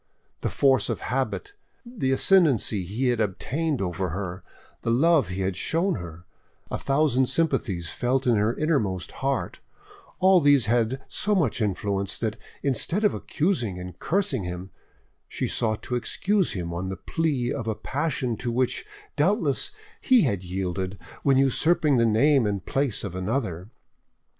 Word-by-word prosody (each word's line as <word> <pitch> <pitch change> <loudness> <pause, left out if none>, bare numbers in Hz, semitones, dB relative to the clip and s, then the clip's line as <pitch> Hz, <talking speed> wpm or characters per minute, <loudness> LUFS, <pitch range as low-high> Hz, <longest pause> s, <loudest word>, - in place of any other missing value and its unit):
The - - -1
force 135 -5 +3
of - - -2
habit, 135 - -2 0.3
the 225 - -2
ascendancy 135 - +3
he 120 +8 -1
had 120 -2 +1
obtained 135 - -1
over 90 0 -2
her, 90 +1 -5 0.4
the - - -2
love 145 - +4
he 90 +2 -4
had 95 0 -1
shown 165 - 0
her, 85 0 -9 0.5
a - - -2
thousand 135 -2 +2
sympathies 115 - 0
felt 130 +2 0
in 120 -2 +4
her 105 +2 +2
inmost 120 - -1
heart, 135 -10 -2 0.6
all 185 -1 +5
these 140 -5 +5
had 120 +3 +1
so 210 0 0
much 145 - +1
influence, 100 -1 -1
that, 110 -2 -2 0.3
instead 155 - 0
of 210 - +4
accusing 145 - -1
and 90 -1 -8
cursing 160 - 0
him, 90 +1 -6 0.6
she - - -2
sought 110 -2 -1
to - - -5
excuse 195 - 0
him 85 -3 -4
on 90 +2 -3
the 95 - -4
plea 140 -7 -1
of 115 - -4
a 110 - 0
passion 135 -4 -2
to 120 +1 -3
which, 125 +1 0 0.3
doubtless, 160 - +1 0.3
he 250 -5 +5
had 100 -9 0
yielded 95 +1 -3 0.2
when 135 -2 +3
usurping 145 +2 +3
the 115 -1 +4
name 120 +2 +4
and 100 -2 -2
place 135 -5 -1
of 100 - -5
another. 95 -1 -2
120 Hz, 155 wpm, -25 LUFS, 95-145 Hz, 0.6 s, all